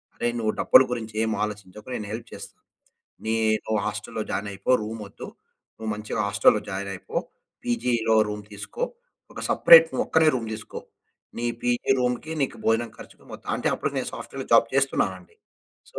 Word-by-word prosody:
అరే, 120 - -1
నువ్వు 110 -1 0
డబ్బుల - - +7
గురించి 110 -2 -6
ఏం 110 - -1
ఆలోచించకు, 105 0 -9
నేను 105 - -6
హెల్ప్ 115 0 -7
చేస్ - - -8 0.8
నే 110 +1 0 0.3
నువ్వు 110 -1 0
హాస్టల్లో 105 +2 -4
జాయినయిపో, 100 +3 -3
రూమొద్దు. 105 -2 -7 0.5
నువ్వు 110 0 -6
మంచిగా 105 0 -4
హాస్టల్లో 100 +1 +4
జాయినయిపో, 95 -1 -5 0.5
పీజీలో 120 -1 +1
రూమ్ 105 0 -5
తీసుకో. 105 - -7 0.5
ఒక - - -7
సపరేట్, 165 -1 +8
నువ్వొక్కనివే 160 -1 +3
రూమ్ 115 -2 -4
తీసుకో. 110 -1 -7 0.6
నీ 120 - -1 0.2
పీజీ 120 +1 0
రూమ్‌కి, 125 +5 -1
నీకు 135 - -2
భోజనం 115 +1 +1
ఖర్చుకు - - -14
మొత్తం - - -7
అంటే, - - 0
అప్పుడికి - - -3
నేను - - -3
సాఫ్ట్‌వేర్‌లో 135 -1 -7
జాబ్ 115 0 +6
చేస్తున్నానండి. 95 -9 0 0.6
సో, - - -6
110 Hz, 150 wpm, -25 LUFS, 105-120 Hz, 0.8 s, సపరేట్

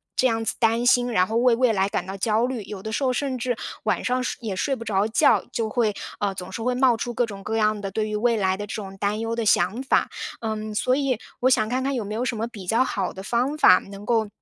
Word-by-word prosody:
这 260 - +3
样 225 -2 0
子 - - -1
担 230 +1 +2
心。 245 0 +4
然 185 -3 +4
后 225 +1 -1
为 245 -1 +4
未 250 0 +3
来 195 0 +2
感 - - -2
到 190 +1 -6
焦 220 +4 +1
虑， 255 -3 -3
有 195 -1 -8
的 220 - -4
时 245 +6 -1
候 255 - +2
甚 260 0 -2
至 245 0 -1 0.3
晚 220 - 0
上 255 0 0
睡 - - -3
也 215 -5 -3
睡 270 +8 0
不 230 - -8
着 205 -1 +1
觉， 220 - +4
就 225 -1 -1
会 220 -2 +1 0.3
呃， 200 -1 0
总 180 -1 -7
是 230 - -5
会 250 +2 0
冒 250 -2 +4
出 240 +1 -4
各 245 - +1
种 200 -3 -9
各 220 - -3
样 215 -1 +2
的 195 -1 -5
对 215 +2 -1
于 210 - -2
未 235 +1 +2
来 190 -1 +1
的 205 0 -5
这 - - -6
种 195 -2 -7
担 205 +2 -1
忧 225 0 -2
的 230 -1 -2
想 200 +5 +2
法。 265 - +2 0.3
嗯， 215 -1 -4
所 255 +4 +2
以 270 -4 0 0.2
我 255 - +3
想 215 -4 +2
看 255 +2 -1
看 275 +1 0
有 235 - -2
没 205 +1 -5
有 235 +3 -1
什 240 - -1
么 225 - -1
比 205 -7 -10
较 230 +5 +3
好 200 -7 -2
的 190 - -8
方 250 +7 0
法 185 -9 +7
能 200 +1 -11
够 225 -2 +1
225 Hz, 305 characters per minute, -24 LUFS, 205-245 Hz, 0.3 s, 法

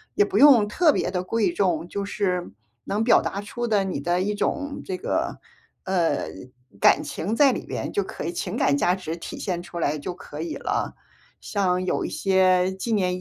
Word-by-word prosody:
也 410 - +5
不 390 - -2
用 260 -8 +7
特 310 +9 +4
别 - - 0
地 180 -1 -2
贵 205 0 +1
重， 175 -2 0
就 200 +2 -4
是 185 - -2 0.3
能 210 +3 -1
表 235 - +5
达 200 - -3
出 240 +4 -4
的 210 -4 +2
你 185 -7 -3
的 175 +4 0
一 205 +2 -1
种 285 +6 -2
这 185 - -3
个， - - -2 0.5
呃， 180 -3 +1 0.5
感 - - +5
情 205 +7 -3
在 280 +1 +6
里 - - -5
边 - - -4
就 200 - 0
可 185 - -7
以， 170 - -2
情 170 - -4
感 145 - +2
价 175 - +2
值 175 -3 -4
体 170 - -8
现 175 -3 -3
出 175 -1 -7
来 155 -2 0
就 150 +5 -5
可 150 -4 -10
以 170 - -4
了。 - - -2 0.5
像 185 -3 0
有 - - 0
一 - - -3
些 185 -1 +3
纪 225 +4 -3
念 185 -3 +1
190 Hz, 220 characters per minute, -24 LUFS, 175-210 Hz, 0.5 s, 用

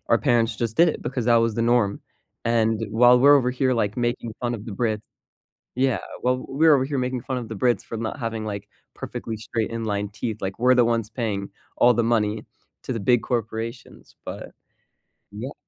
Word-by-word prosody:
our 115 - +4
parents 115 -3 +2
just 115 -2 -2
did 170 +1 +6
it - - -3
because 125 -3 -3
that 120 - +5
was 115 -1 +2
the 115 - 0
norm, 115 -4 +2 0.4
and 115 -1 +1
while 125 +2 +6
we're 145 +3 +7
over 125 -2 +1
here 130 +1 +1
like 105 -1 -1
making 120 -1 -2
fun 120 -1 -1
of 105 -1 -7
the 110 - -7
Brits 110 0 -1 0.7
Yeah, 130 -2 +2 0.2
well, 125 +1 0
we're 155 +2 +5
over 130 -1 +2
here 140 -1 -2
making 125 0 -1
fun 130 - -3
of 120 -3 -7
the 110 - -5
Brits 120 -1 +1
for 115 - -6
not 115 +5 -4
having, 115 -2 -3
like, 100 -1 -5 0.3
perfectly 115 - -6
straight 110 +1 -3
inline 105 -3 -2
teeth, 110 0 -4
like, 95 0 -4
we're 125 +2 +4
the 125 -1 +5
ones 115 -2 0
paying 105 -5 -3 0.3
all 125 0 +6
the 120 - +2
money 105 0 -1 0.4
to - - -3
the 115 - -3
big 120 +4 +3
corporations, 115 0 -5
but - - -7 0.8
yeah. 120 +7 -6
115 Hz, 205 wpm, -24 LUFS, 110-125 Hz, 0.8 s, we're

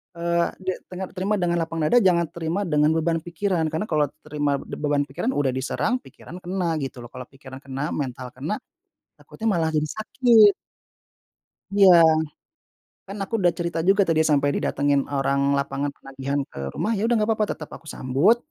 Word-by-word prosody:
eee 170 0 +1 0.2
de 185 - 0 0.2
tenga 185 +1 -4
terima 200 +3 0
dengan 175 -1 +1
lapang 165 0 -3
dada 245 +11 +5
jangan 180 -4 +3
terima 170 +3 -2
dengan 150 -3 +2
beban 165 +1 +1
pikiran, 170 0 -1
karena 160 - -1
kalau 150 -1 +2 0.2
terima 145 -2 -1
d - - -12
beban 145 -1 +1
pikiran 150 - -2
udah 140 -2 +1
diserang 140 - -1
pikiran 180 -8 -12
kena 175 -2 -1
gitu 130 -2 -6
loh 120 - -11
kalau 125 -1 -9
pikiran 130 -1 -12
kena, 135 +3 -4
mental 130 -3 -4
kena, 150 +11 -3 0.6
takutnya 225 - -7
malah 165 -4 +1
jadi 155 -1 0
sakit. 215 +2 +4 1.2
Iya, 200 -1 +6 1.2
kan 195 +2 -7
aku 195 - -10
udah 175 -3 +3
cerita 170 -1 -2
juga 195 +2 +4
tadi 160 -1 +3
sampe 145 -2 +3
didatengin 140 -1 +1
orang 140 0 +1
lapangan 140 0 -2
penagihan 135 +1 -4
ke - - -10
rumah 220 - -1
ya - - -2
udah 240 - +2
gak 210 - 0
papa 215 - +2
tetep 155 - -10
aku 160 - -15
sambut, 150 - +2
160 Hz, 175 wpm, -24 LUFS, 140-185 Hz, 1.2 s, Iya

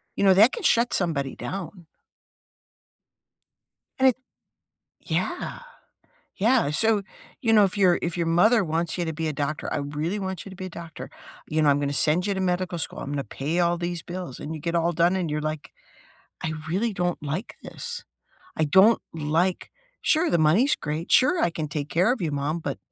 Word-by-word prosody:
You - - -1
know, 190 - +7
that 215 +7 +7
can 465 - -6
shut 240 -6 +3
somebody 155 -7 -1
down. 185 -2 -7 2.1
And 265 0 +6
it 250 - 0 0.9
yeah! - - -3 0.8
Yeah, 225 - +3
so, 215 +5 +3 0.4
you 225 -3 +2
know, 210 -2 +7
if 195 +2 -3
your 185 -3 +4
if 170 0 -2
your 170 - 0
mother 195 +7 +4
wants 165 +1 -2
you 175 - -1
to 160 - -3
be 160 +1 -3
a 155 - -2
doctor, 145 +2 -3
"I - - 0
really 150 +7 -3
want 190 -3 -5
you - - -8
to 190 - -10
be 185 0 -6
a - - -6
doctor," 165 -2 -9 0.4
you 155 +1 0
know, 150 - +4
"I'm 140 0 +3
gonna 140 -1 -1
send 155 +5 +2
you 205 - 0
to 190 - -3
medical 180 -1 -1
school, - - -4
I'm 140 - -5
gonna 140 -1 -2
pay 145 +9 -3
all 175 0 +2
these 175 0 -3
bills," 175 -5 -7
and 155 +2 -5
you 155 - -8
get 170 +2 -2
all 170 0 +2
done 170 +3 +3
and 180 -4 -1
you're 150 0 -2
like, 155 0 -4 0.7
"I 160 - -2
really 200 +8 0
don't 175 -2 -2
like 155 +9 -4
this, - - -6 0.5
I 160 - +2
don't 190 +9 +5
like 165 +4 0 0.3
sure, 330 +2 +2
the 170 - +2
money's 180 - +4
great, 155 +2 -4
sure, 350 +8 +5
I - - +3
can 160 -2 -4
take 145 -1 -4
care 185 +8 +3
of 255 - -4
you, 160 - 0
mom, 145 +3 -2
but, - - -4
170 Hz, 200 wpm, -25 LUFS, 155-190 Hz, 2.1 s, know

